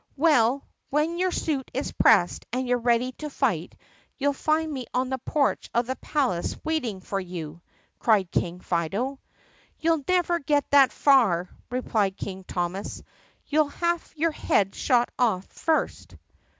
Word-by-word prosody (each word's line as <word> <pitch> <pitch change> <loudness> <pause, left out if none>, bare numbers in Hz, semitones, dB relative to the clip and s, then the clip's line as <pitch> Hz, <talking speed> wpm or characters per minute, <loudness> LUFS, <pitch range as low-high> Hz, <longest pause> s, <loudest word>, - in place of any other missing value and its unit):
"Well, 275 -4 +3 0.2
when 310 +4 0
your 370 0 +2
suit 295 -6 -2
is 270 - -2
pressed 175 - +3
and 255 +1 -1
you 245 - +2
're - - -2
ready 240 +1 +2
to 300 - -4
fight 210 - -1 0.4
you'll 285 +1 +1
find 310 +2 0
me 255 -3 -5
on 255 +1 +1
the 265 0 -2
porch 285 +3 0
of 235 +1 +3
the 260 +2 -3
palace 255 - -1
waiting 255 -12 -2
for 195 +2 -3
you!" 170 -3 -7 0.4
cried 200 -6 +2
King 180 +1 -1
Fido. 200 - -2 0.6
"You'll 325 -2 +1
never 350 -1 +2
get 290 -1 +1
that 275 -2 +6
far!" 215 -11 +3 0.2
replied 220 -6 0
King 190 -1 -6
Thomas. 180 +3 -4 0.4
"You 305 +1 +3
'll 300 - +1
have 340 +2 -2
your 325 +2 +1
head 195 -9 +1
shot 245 -2 +2
off 215 -7 +2
first." 320 -1 -1
255 Hz, 155 wpm, -26 LUFS, 195-300 Hz, 0.6 s, that